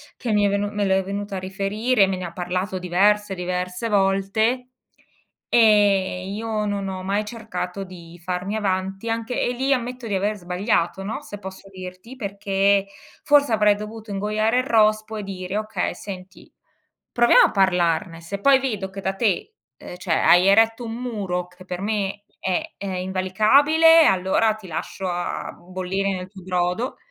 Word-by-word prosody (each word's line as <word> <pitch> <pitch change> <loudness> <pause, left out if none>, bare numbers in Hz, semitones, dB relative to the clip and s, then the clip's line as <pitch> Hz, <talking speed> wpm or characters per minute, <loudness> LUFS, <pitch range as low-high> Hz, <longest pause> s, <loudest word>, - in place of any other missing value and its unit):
che 235 -4 -4
mi 205 -1 +3
è - - +3
venu 200 +1 0
me 205 -1 -1
l'è 190 0 +2
venuta 200 +1 -4
a - - -2
riferire, 200 +3 +1
me 190 - -1
ne 185 - -6
ha 170 - -5
parlato 185 +2 -3
diverse, 195 +3 +2
diverse 180 +4 -3
volte 205 +5 +1 0.8
e 200 -5 +3
io 215 0 -2
non 200 -1 -2
ho 185 -1 -5
mai 200 +2 -1
cercato 200 -4 -5
di 175 -2 -12
farmi 180 +3 -3
avanti 195 +1 -2
anche 230 +2 -2
e - - +1
lì 265 +3 +1
ammetto 250 -1 -3
di 205 - -1
aver 205 +2 0
sbagliato, 180 0 -1
no, 215 +3 -4
se 205 - -9
posso 190 0 -10
dirti, 185 +6 -10
perché 200 -2 +1 0.4
forse 285 -3 +4
avrei 210 -1 +4
dovuto 215 +1 -8
ingoiare 215 +4 +1
il - - +1
rospo 215 -1 +2
e 210 - -4
dire: 190 0 -5
"Okay, 215 0 -2
senti, 190 -1 -10 0.6
proviamo 240 0 +6
a - - -7
parlarne. 175 -2 +1
Se 200 +4 -6
poi 270 +3 +6
vedo 210 -8 -3
che 195 +1 -8
da 190 0 -1
te, 220 - 0 0.3
uhm, 180 - -9
cioè, 175 -3 -1
hai 175 +2 +5
eretto 225 +4 +4
un 225 - -5
muro 200 -8 -3
che 180 +1 -16
per 180 0 -5
me 205 -1 -2 0.2
è 185 -1 -2
è 200 - -6
invalicabile, 265 - +4
allora 190 +4 +2
ti 215 -3 -14
lascio 185 +3 -5
a 175 -1 -3
bollire 185 +2 -3
nel 185 -1 -4
tuo 190 -1 -13
brodo", 180 +7 -1
200 Hz, 170 wpm, -23 LUFS, 185-220 Hz, 0.8 s, proviamo